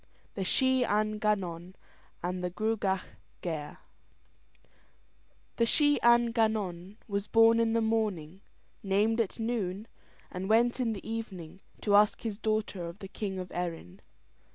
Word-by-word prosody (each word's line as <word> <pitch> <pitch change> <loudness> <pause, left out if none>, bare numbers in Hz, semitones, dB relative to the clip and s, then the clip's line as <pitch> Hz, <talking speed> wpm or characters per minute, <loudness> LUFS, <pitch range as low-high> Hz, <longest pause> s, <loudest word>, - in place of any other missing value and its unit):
THE 195 - -3
SHEE 260 +6 +2
AN 215 -1 0
GANNON 185 -4 -1 0.5
AND 180 +1 -3
THE 180 - 0
GRUAGACH 200 -1 -1 0.4
GAIRE 155 -4 -4 1.8
The 230 - +3
Shee 290 +3 +3
an 235 0 +5
Gannon 210 -4 -1
was 200 -1 -2
born 225 +1 +5
in 225 -1 +2
the 230 - +2
morning, 200 -6 -1 0.4
named 210 +4 +2
at 215 - -3
noon, 220 -3 -2 0.4
and 185 +2 -5
went 235 +3 +3
in 235 -3 0
the 200 - -8
evening 195 -7 -6 0.2
to 205 - +1
ask 210 0 +4
his 215 -3 -4
daughter 215 -4 -1
of 170 +2 -8
the 195 - -8
king 195 -1 -4
of 185 -1 -6
Erin. 170 - -5
210 Hz, 140 wpm, -30 LUFS, 185-225 Hz, 1.8 s, an